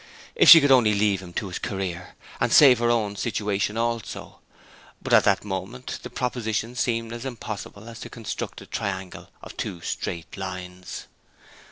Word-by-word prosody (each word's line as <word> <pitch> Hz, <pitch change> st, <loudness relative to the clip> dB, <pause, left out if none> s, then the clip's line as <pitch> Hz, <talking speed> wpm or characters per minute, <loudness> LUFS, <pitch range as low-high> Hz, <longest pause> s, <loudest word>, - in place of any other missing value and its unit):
If 465 Hz, -, +5 dB
she 165 Hz, -, +13 dB
could 145 Hz, -2 st, +3 dB
only 115 Hz, -5 st, +5 dB
leave 100 Hz, -2 st, +1 dB
him 90 Hz, -2 st, -10 dB
to 100 Hz, -, -3 dB
his 90 Hz, -, -5 dB
career, 90 Hz, -3 st, -5 dB, 0.2 s
and -, -, +1 dB
save 130 Hz, -5 st, +7 dB
her 120 Hz, 0 st, +2 dB
own 110 Hz, -4 st, +1 dB
situation 105 Hz, -1 st, -1 dB
also! 115 Hz, -1 st, -3 dB, 0.6 s
But -, -, -3 dB
at -, -, +6 dB
that 100 Hz, 0 st, +2 dB
moment 100 Hz, +6 st, -5 dB
the -, -, -8 dB
proposition 115 Hz, -2 st, -2 dB
seemed 115 Hz, -2 st, -1 dB
as 120 Hz, 0 st, -7 dB
impossible 110 Hz, -4 st, -7 dB
as 115 Hz, -1 st, -9 dB
to -, -, -8 dB
construct 115 Hz, -3 st, -6 dB
a -, -, -11 dB
triangle 95 Hz, -2 st, -5 dB
of -, -, -10 dB
two 90 Hz, -, -4 dB
straight 85 Hz, 0 st, -5 dB
lines. 90 Hz, -1 st, -7 dB
105 Hz, 170 wpm, -25 LUFS, 95-120 Hz, 0.6 s, she